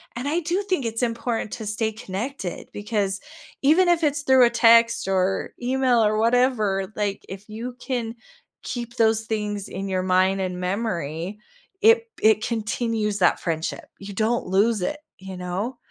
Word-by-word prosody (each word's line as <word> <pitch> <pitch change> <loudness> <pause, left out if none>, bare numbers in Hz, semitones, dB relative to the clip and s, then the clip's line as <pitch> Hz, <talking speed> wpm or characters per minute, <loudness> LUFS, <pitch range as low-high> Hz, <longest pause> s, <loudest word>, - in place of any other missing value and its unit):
and 250 +4 -4
I 325 +4 +1
do 350 +5 0
think 290 -10 0
it's 225 +1 -2
important 230 -2 -2
to 220 -3 -6
stay 220 +1 -1
connected 210 -1 -5
because 205 -2 -2 0.4
even 350 +6 +5
if 340 -2 +3
it's 290 -1 +1
through 260 -3 +6
a 235 - +2
text 230 -2 +5
or 190 0 0
email 250 -2 +2
or 215 0 +1
whatever, 220 -5 +2
like, 205 -2 -2
if 195 +3 -9
you 240 +3 -6
can 240 -3 -3 0.5
keep 240 -1 -5
those 225 -1 +3
things 210 -2 -3
in 195 +1 -5
your 185 -1 0
mind, 185 +1 +2
and 180 -1 -3
memory, 180 -2 -3 0.4
it 455 +2 +5
it 215 0 +4
continues 220 -2 -1
that 175 - +3
friendship, 165 -1 -3
you 200 0 -8
don't 225 +3 0
lose 205 +3 +2
it, 295 +9 -2 0.2
you 190 -1 -8
know, 190 +8 -3
220 Hz, 160 wpm, -24 LUFS, 195-245 Hz, 0.5 s, through